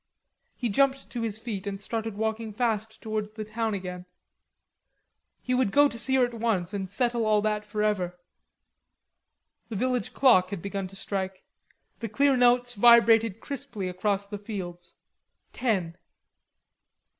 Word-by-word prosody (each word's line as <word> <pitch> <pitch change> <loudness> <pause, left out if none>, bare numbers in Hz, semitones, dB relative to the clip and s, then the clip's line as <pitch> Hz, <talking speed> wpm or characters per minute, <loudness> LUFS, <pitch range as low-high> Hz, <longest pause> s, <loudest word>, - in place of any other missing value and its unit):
He 245 - -2
jumped 270 +5 +1
to 240 - -4
his 220 -2 -2
feet 215 -3 -5
and 195 -1 -4
started 220 0 -4
walking 220 0 -2
fast 220 -1 -1
towards 215 -1 -3
the 215 -1 -6
town 220 0 -2
again. 180 -1 -6 1.4
He 255 - -1
would 250 -5 +2
go 290 +4 +6
to 235 -4 -6
see 265 +4 +3
her 255 -1 +5
at 240 - -7
once 215 -5 -1
and 190 -2 -3
settle 235 +3 +1
all 215 -1 +3
that 210 -1 0
forever. 210 -4 -1 1.5
The 225 - -5
village 250 +3 -1
clock 210 -9 +5
had 200 - -4
begun 195 -1 -3
to 190 - -14
strike; 190 -1 -4 0.6
the 230 - -4
clear 275 +6 +3
notes 245 0 +3
vibrated 225 -1 +5
crisply 270 -9 -5
across 195 +2 -1
the 205 0 -7
fields: 180 -5 -7 0.6
ten. 190 -9 -1
215 Hz, 145 wpm, -27 LUFS, 200-235 Hz, 1.5 s, go